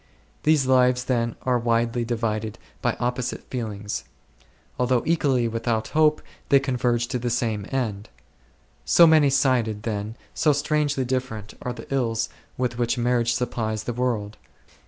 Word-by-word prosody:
These 150 -3 +3
lives 125 -1 +4
then 120 -2 0
are 125 -1 +2
widely 115 0 +1
divided 110 -2 -2 0.2
by - - +1
opposite 125 0 -2
feelings; 105 -5 -4 0.8
although 125 -1 +2
equally 140 -7 +2
without 115 -1 -1
hope, 155 -1 +3 0.3
they 140 - +6
converge 125 -3 0
to 125 -1 -1
the 120 0 -2
same 110 -4 -1
end. 110 -6 -2 0.7
So 170 - +6
many 155 -3 +6
sided, 125 -6 +1
then, 105 0 -3 0.2
so 150 - +3
strangely 145 -2 0
different 125 -5 -3
are 125 - -3
the 115 -2 -10
ills 115 -4 0 0.3
with 125 -1 -2
which 120 +1 +1
marriage 120 -1 +2
supplies 110 -3 -2
the 120 - -3
world. 115 -4 -2
120 Hz, 140 wpm, -24 LUFS, 115-130 Hz, 0.8 s, they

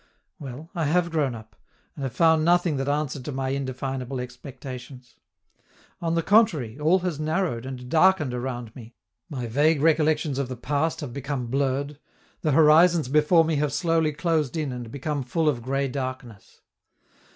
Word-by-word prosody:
Well, 145 +3 -9
I 170 -4 -1
have 170 +3 +1
grown 145 -6 0
up, 110 -1 -12 0.4
and - - -10
have 130 -4 -4
found 160 -1 +4
nothing 175 -2 +3
that 135 +1 -2
answered 145 -2 -2
to - - -4
my 135 0 -2
indefinable 130 -1 -3
expectations; 125 0 -9 0.8
on 165 -1 0
the 165 - +1
contrary, 155 - +2
all 160 +5 +4
has 175 -5 -3
narrowed 155 -6 -1
and 125 -2 -7
darkened 160 -2 +3
around 120 -2 -5
me, 120 -2 -12 0.3
my 130 -5 -4
vague 145 +6 +2
recollections 155 -2 +2
of 140 - -1
the 130 - -5
past 145 +5 -1
have 135 -5 -6
become 140 -1 -3
blurred, 140 +1 -1 0.4
the 155 - +1
horizons 160 0 +5
before 155 +3 +4
me 160 -2 0
have 145 0 0
slowly 165 0 +1
closed 160 -2 -1
in 150 -4 -2
and 120 -2 -6
become 145 +3 -3
full 155 +5 -1
of 135 -6 +1
gray 135 +3 -1
darkness. 130 -5 -7
145 Hz, 165 wpm, -25 LUFS, 130-160 Hz, 0.8 s, horizons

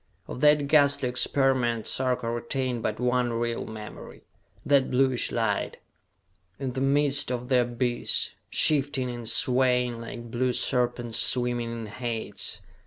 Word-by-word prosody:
Of 125 - -7
that 150 -1 +4
ghastly 140 -3 +3
experiment 125 -3 +1
Sarka 130 -3 -1
retained 120 +1 -2
but 110 0 -3
one 125 -1 +1
real 115 0 -2
memory.... 110 -1 -10 0.4
That 140 -2 +3
bluish 130 -1 +2
light, 115 -3 -1 0.8
in 135 -1 -3
the 130 +1 -4
midst 140 0 +3
of 125 0 -4
the 130 -2 +4
abyss, 120 0 -1 0.2
shifting 140 -4 +2
and 120 -2 -6
swaying 125 -2 +1
like 120 0 -8
blue 125 +1 0
serpents 120 -2 -1
swimming 120 -2 +1
in 115 -1 -5
Hades 115 +1 -4
125 Hz, 130 wpm, -26 LUFS, 120-130 Hz, 0.8 s, that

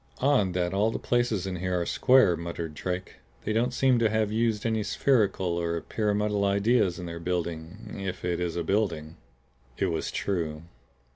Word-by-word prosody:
"Odd 125 -9 +2
that 90 0 0
all 105 +3 +2
the 115 - -3
places 120 -6 0
in 95 -1 -3
here 90 0 -1
are 85 - -1
square," 125 -7 +4
muttered 85 -1 -5
Drake. 90 +5 -4 0.3
"They 110 - -1
don't 120 +3 +1
seem 130 -1 +3
to 115 -1 +3
have 110 -1 0
used 110 -1 0
any 110 -1 +1
spherical 100 -6 +1
or 85 0 -1
pyramidal 105 +1 0
ideas 100 -1 +2
in 90 - -6
their 85 0 -6
building 85 +2 -4
if 95 -2 -4
it 90 -1 0
is 90 -1 -2
a 85 - -1
building." 80 -5 -1 0.6
It 95 -3 0
was 80 - -2
true. 80 -5 -2
95 Hz, 175 wpm, -27 LUFS, 85-110 Hz, 0.6 s, square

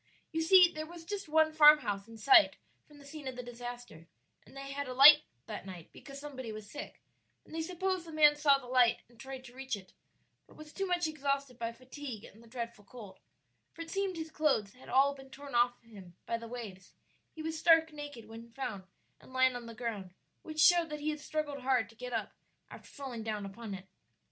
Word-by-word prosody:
You 325 -1 -1
see 360 +2 +8
there 310 0 -5
was 335 0 -11
just 390 -2 -5
one 315 0 +3
farmhouse 295 -10 +5
in 225 0 -12
sight 335 - +6 0.3
from 295 - -17
the 285 - -15
scene 290 -1 -9
of 260 - -5
the 250 - -6
disaster, 245 -8 -9 0.4
and 270 - -16
they 275 0 -7
had 285 0 -4
alight 280 +4 +9 0.2
that - - -7
night 180 -3 -10
because 275 -1 -11
somebody 265 -5 -7
was 215 -1 -8
sick; 290 +7 -9 0.4
and - - -15
they 325 - -2
supposed 365 +1 -2
the - - -8
man 300 -1 +6
saw 295 -2 +4
the 275 - -12
light 245 -1 +3
and 235 -1 -24
tried 265 +1 -8
to 245 -2 -13
reach 265 -1 -4
it, 190 -2 -13 0.5
but - - -19
was 310 0 -12
too 390 -1 -2
much 355 -1 +1
exhausted 275 -4 -2
by 230 0 -2
fatigue 255 -1 -9
and 220 - -14
the 235 - -17
dreadful 235 -3 -6
cold, 200 -3 -12 0.5
for 330 - -7
it 330 - -11
seemed 390 -2 -1
his 320 -1 -6
clothes 270 -11 +1
had 255 - -15
all 275 +2 +4
been 270 -1 -13
torn 280 0 -11
off 240 0 +2
him 195 -6 -14
by 230 - -1
the 230 0 -6
waves; 215 -6 -9 0.4
he 315 - -7
was 320 0 -3
stark 325 -1 +5
naked 290 -6 -8
when 230 +1 -11
found, 220 -6 -6 0.3
and - - -17
lying 260 -1 +3
on 240 -1 -7
the 230 - -9
ground, 210 -6 -5 0.3
which 310 -1 -7
showed 345 0 +6
that 300 -1 -6
he 305 +1 0
had 300 - -6
struggled 295 -2 -3
hard 255 -4 +1
to 225 - -18
get 250 +2 -8
up 225 -2 -3 0.4
after - - -12
falling 265 -5 -7
down 215 -2 -4
upon 200 +1 -7
it. 190 0 -10
265 Hz, 220 wpm, -32 LUFS, 230-305 Hz, 0.5 s, alight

